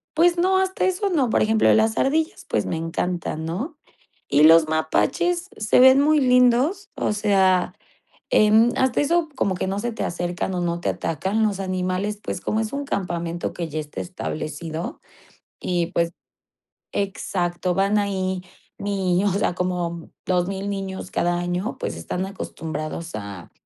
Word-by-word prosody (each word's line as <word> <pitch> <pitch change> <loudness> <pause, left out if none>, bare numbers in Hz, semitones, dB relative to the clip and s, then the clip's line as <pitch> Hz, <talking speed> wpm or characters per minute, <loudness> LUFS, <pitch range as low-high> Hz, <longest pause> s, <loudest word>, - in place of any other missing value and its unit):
Pues 345 +2 +4
no, 375 +2 +3
hasta 380 0 +1
eso 375 +2 0
no, 285 -9 +1
por - - +2
ejemplo, 220 0 +4
las 220 0 +2
ardillas, 315 +4 0
pues, - - -1
me - - -2
encantan, 165 -1 -3
¿no? 235 - -4 0.5
Y 145 +1 +4
los 160 0 +7
mapaches 345 - 0
se 215 +2 +3
ven 260 +2 +8
muy 305 +1 +4
lindos, 250 +8 +3
o - - 0
sea, 195 -3 +2 0.6
em, 215 +2 +5
hasta 260 -2 +2
eso, 335 +2 +2
como 195 -6 +1
que 180 - -2
no 195 +1 -2
se 240 +3 -2
te 225 - -3
acercan 175 +2 -3
o 180 - -1
no 170 -1 -1
te - - 0
atacan, 190 +7 -1
los 205 -3 0
animales, 185 +2 -2
pues, - - -4
como 215 - 0
es 220 0 -3
un 285 0 -2
campamento 175 -7 -3
que 170 -2 -4
ya 155 +1 -3
está 150 -1 -7
establecido 165 -2 -5 0.6
y 175 -2 0
pues 170 -1 -1 0.8
exacto, 180 -3 -1
van 195 +2 +2
ahí 190 -2 -1 0.4
ni 190 -2 0
o - - +4
sea, 195 - +1
como 175 -2 -2 0.2
2000 190 +2 -1
niños 195 -2 -5
cada 175 0 +1
año, 175 +6 -2
pues - - -3
están 180 - -3
acostumbrados 165 -3 -5
a 100 -4 -8
190 Hz, 160 wpm, -23 LUFS, 175-235 Hz, 0.8 s, ven